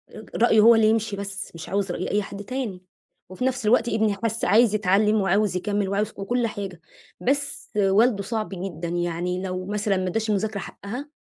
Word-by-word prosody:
ر 215 - -9
رأيه 225 -1 +4
هو 230 +2 +8
اللي 220 -1 +4
يمشي 225 -2 0
بس، 200 0 -5
مش 165 - -8
عاوز 195 -1 -1
رأي 175 - -3
أي 210 - +2
حد 200 +1 -8
تاني. 220 -5 -4 0.5
وفي 185 +7 -4
نفْس 260 -3 -1
الوقت، 235 +1 +3
ابني 220 -1 +1
حِس 225 0 0
عايز 220 0 +4
يتعلَّم 210 +1 +3
وعاوز 195 0 +2
يكمِّل 205 +1 -1
وعاوز 205 +2 0
و - - -6
وكل 240 +3 0
حاجة، 195 -5 -6 0.4
بس 280 +2 -1
والده 205 +2 +3
صعب 220 +1 -3
جدًا. 180 -3 -5
يعني 175 +1 -2
لو 185 -1 -4
مثلًا 205 0 0
ما 185 0 -1
اداش 220 +4 -1
المذاكرة 210 0 0
حقها، 245 +10 -7
205 Hz, 190 wpm, -24 LUFS, 190-225 Hz, 0.5 s, هو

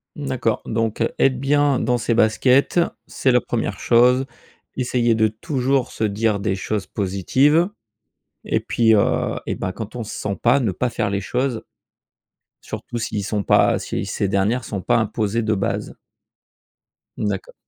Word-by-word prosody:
Mmh, 145 - -6
d'accord 120 -4 -1
donc 115 -1 -2 0.2
être 130 -2 +2
bien 145 -1 +2
dans 125 +2 +1
ses 115 +1 0
baskets 125 +8 +3 0.3
c'est 130 - +1
la 125 -1 +4
1re 110 -4 -3
chose, 125 +2 +4 0.5
essayer 120 -2 +1
de 110 0 +3
toujours 130 +4 -1
se - - -4
dire 105 0 +1
des 100 -1 -1
choses 100 +1 -3
positives, 130 - +2 0.8
et - - 0
puis, 115 -2 +2
heu, 100 - +1
et - - -1
bah, 95 - -4
quand 110 +3 -7
on 120 - -4
se 105 - -8
sent 100 -1 -3
pas 125 +4 +4
ne 115 - +1
pas 125 +6 -1
faire 110 -3 -1
les 100 - -1
choses. 125 +1 -2 1.0
Surtout 120 - -6
s'ils 105 -3 -3
sont 105 0 -1
pas, - - +3
si - - -4
ces 100 - -1
dernières 100 +6 +1
sont 105 -3 -5
pas - - +2
imposées 110 +1 -1
de 110 0 +1
base. 95 - -3 1.2
D'accord. 100 -3 -3
115 Hz, 165 wpm, -21 LUFS, 105-125 Hz, 1.2 s, la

